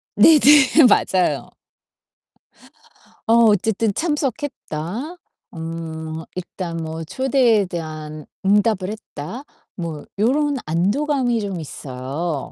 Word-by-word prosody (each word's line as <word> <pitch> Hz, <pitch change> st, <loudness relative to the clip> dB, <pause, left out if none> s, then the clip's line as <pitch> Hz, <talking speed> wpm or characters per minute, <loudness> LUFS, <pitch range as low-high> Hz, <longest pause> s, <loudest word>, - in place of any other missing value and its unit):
네네. 295 Hz, -1 st, +7 dB
맞아요. 185 Hz, -2 st, +1 dB, 1.8 s
어 225 Hz, -, +4 dB, 0.2 s
'어쨌든 215 Hz, +1 st, +1 dB
참석했다. 275 Hz, -, -3 dB, 0.4 s
음 160 Hz, -1 st, -6 dB
일단 175 Hz, -1 st, -5 dB
뭐 160 Hz, 0 st, -5 dB
초대에 245 Hz, -, +2 dB
대한 155 Hz, -3 st, -7 dB, 0.2 s
응답을 200 Hz, -1 st, +2 dB
했다.' 215 Hz, -, -8 dB, 0.3 s
뭐 165 Hz, -4 st, -5 dB
요런 280 Hz, +7 st, +1 dB
안도감이 240 Hz, -, 0 dB
좀 195 Hz, -4 st, -4 dB
있어요. 140 Hz, +1 st, -5 dB
190 Hz, 180 characters per minute, -21 LUFS, 160-255 Hz, 1.8 s, 네네